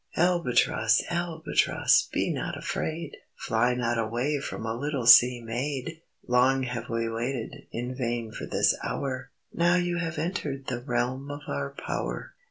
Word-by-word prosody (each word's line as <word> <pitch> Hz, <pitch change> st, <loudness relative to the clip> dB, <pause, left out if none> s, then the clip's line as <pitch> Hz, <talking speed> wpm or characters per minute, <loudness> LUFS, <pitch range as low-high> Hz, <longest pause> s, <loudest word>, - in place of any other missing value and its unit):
"Albatross! 125 Hz, -10 st, +3 dB
Albatross! 170 Hz, -2 st, +2 dB
Be -, -, 0 dB
not -, -, -3 dB
afraid, 160 Hz, -1 st, -4 dB, 0.2 s
Fly 120 Hz, +2 st, +1 dB
not 120 Hz, -1 st, 0 dB
away 120 Hz, +6 st, 0 dB
From 125 Hz, -, -5 dB
a 110 Hz, -, -1 dB
little 140 Hz, 0 st, -2 dB
sea 120 Hz, +2 st, +8 dB
maid. 135 Hz, +7 st, -4 dB, 0.3 s
Long 130 Hz, +2 st, +3 dB
have 125 Hz, -1 st, -4 dB
we 115 Hz, 0 st, -1 dB
waited 115 Hz, +1 st, -4 dB
In 120 Hz, +2 st, -4 dB
vain 120 Hz, -3 st, -2 dB
for -, -, -6 dB
this -, -, +3 dB
hour, 130 Hz, -1 st, -3 dB, 0.2 s
Now 170 Hz, +1 st, +3 dB
you 175 Hz, -1 st, 0 dB
have 165 Hz, -2 st, -3 dB
entered 150 Hz, -5 st, -3 dB
The 120 Hz, -2 st, -3 dB
realm 125 Hz, +2 st, -2 dB
of 145 Hz, 0 st, -6 dB
our 70 Hz, 0 st, -2 dB
power." -, -, -4 dB
125 Hz, 150 wpm, -27 LUFS, 115-150 Hz, 0.3 s, sea